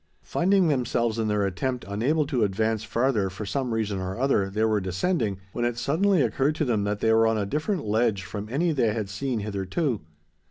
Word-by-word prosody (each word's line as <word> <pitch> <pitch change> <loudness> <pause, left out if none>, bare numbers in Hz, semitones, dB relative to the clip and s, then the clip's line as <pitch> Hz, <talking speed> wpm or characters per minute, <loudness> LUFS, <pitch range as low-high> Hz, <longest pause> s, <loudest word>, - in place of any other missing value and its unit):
Finding 190 0 +2
themselves 120 -5 0
in 110 - 0
their 105 -1 +1
attempt 120 +7 -2
unable 130 +10 +1
to 130 -6 0
advance 110 +2 0
farther 110 -2 +1
for 100 +3 -6
some 130 +3 -2
reason 105 -3 -1
or 95 +3 -4
other, 125 -7 +2
they 105 +3 0
were 110 -2 +1
descending, 100 - -1 0.2
when 120 - -2
it 120 -1 0
suddenly 160 +7 +2
occurred 140 +3 +1
to 155 - 0
them 110 -5 +1
that 105 0 -2
they 110 - +3
were 115 0 +5
on 110 0 +1
a 105 - 0
different 155 - -2
ledge 110 -2 +1
from 105 +2 -6
any 165 +8 +1
they 120 -8 +1
had 105 -3 -3
seen 120 +1 -2
hitherto. 105 - -2
115 Hz, 205 wpm, -26 LUFS, 105-135 Hz, 0.2 s, were